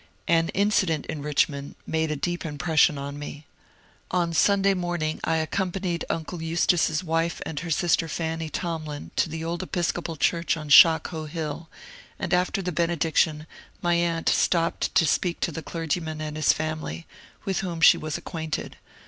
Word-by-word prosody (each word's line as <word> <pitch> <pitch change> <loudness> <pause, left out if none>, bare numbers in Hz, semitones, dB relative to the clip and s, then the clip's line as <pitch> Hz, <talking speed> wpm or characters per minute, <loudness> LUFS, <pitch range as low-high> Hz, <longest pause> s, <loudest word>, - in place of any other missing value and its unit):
An 165 0 +3
incident 190 -6 +2
in 150 - -5
Richmond 140 -1 -1
made 160 0 0
a 155 - -1
deep 175 +4 -2
impression 155 0 +2
on 140 +1 -6
me. 145 0 -8 0.6
On 175 -2 0
Sunday 200 +3 +4
morning 175 -4 -2
I 165 - +1
accompanied 180 +2 -2
uncle 165 +1 -3
Eustace's 165 0 +1
wife 165 0 0
and 150 - -4
her 175 - -6
sister, 165 +1 +2
Fanny 160 0 -3
Tomlin, 155 -3 -4
to - - +2
the 160 +1 -5
old 170 +2 -3
Episcopal 175 -2 -2
church 170 +2 +1
on 155 -2 -7
Shockoe 160 +1 +6
Hill, 160 0 -5 0.5
and 175 - -3
after 180 +2 +1
the 180 - -2
benediction 160 -2 +1 0.4
my 175 0 +2
aunt 170 -1 0
stopped 170 -1 +1
to 165 - +5
speak 170 +3 0
to - - 0
the 160 - -5
clergyman 160 -1 -3
and 155 -1 -4
his 155 -1 +4
family, 155 - -4 0.4
with 190 -1 0
whom 175 -3 -4
she 160 - +7
was 155 +1 -3
acquainted. 160 -2 -5
165 Hz, 160 wpm, -25 LUFS, 155-175 Hz, 0.6 s, she